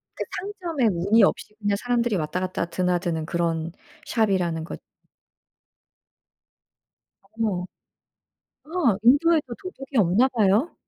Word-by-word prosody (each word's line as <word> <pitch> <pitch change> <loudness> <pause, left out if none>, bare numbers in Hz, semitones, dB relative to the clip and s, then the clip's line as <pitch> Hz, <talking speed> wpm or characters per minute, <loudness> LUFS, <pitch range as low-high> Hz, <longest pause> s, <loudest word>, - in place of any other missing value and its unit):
그 - - -3 0.2
상점에 350 - -1
문이 200 +5 +3
없이 210 - 0
그냥 205 -1 0
사람들이 240 -1 0
왔다 170 +1 -2
갔다 185 -1 -2
드나드는 175 -2 -1
그런 165 -1 -1 0.3
샵이라는 185 -8 0
거 160 - -6 2.7
어. 195 -5 0 1.1
어 310 - +2
인도에도 285 +1 +4
도둑이 275 -7 -8
없나 205 +7 +4
봐요. 220 - +2
210 Hz, 230 characters per minute, -24 LUFS, 175-260 Hz, 2.7 s, 인도에도